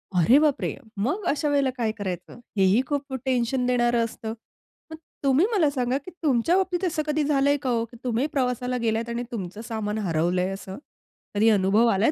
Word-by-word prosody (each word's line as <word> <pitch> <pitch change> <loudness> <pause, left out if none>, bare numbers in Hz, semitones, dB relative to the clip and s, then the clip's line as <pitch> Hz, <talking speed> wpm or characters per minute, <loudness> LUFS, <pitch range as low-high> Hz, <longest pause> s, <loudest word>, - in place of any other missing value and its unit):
अरे 210 - +6
बापरे! 300 -2 +1 0.2
मग 285 - -1
अशा 295 +1 +1
वेळेला 280 -2 +2
काय 225 -3 0
करायचं? 185 +1 -5 0.2
हे 195 - +4
ही 195 +6 +4
खूप 285 -1 -2
खूप 265 -1 -4
टेन्शन 250 0 +1
देणारं 240 -1 +2
असतं. 220 0 -6 0.6
मग 320 - -7 0.3
तुम्ही 275 +5 +4
मला 340 -9 +3
सांगा, 255 -1 0
की 290 +6 -10
तुमच्या 285 +4 +3
बाबतीत 375 -1 0
असं 310 -2 -1
कधी 300 0 +1
झालंय 285 0 +2
का 265 - -2
ओ? 230 -1 +1
की 235 +1 -15
तुम्ही 250 +2 0
प्रवासाला 250 -2 0
गेलायंत 225 +1 0
आणि 235 +1 -2
तुमचं 205 -2 -5
सामान 215 -1 -2
हरवलंय 180 -1 0
असं? 190 -1 -8 0.6
कधी 215 +2 +4
अनुभव 205 +2 +4
आलाय 200 +8 +3
245 Hz, 190 wpm, -25 LUFS, 220-280 Hz, 0.6 s, अरे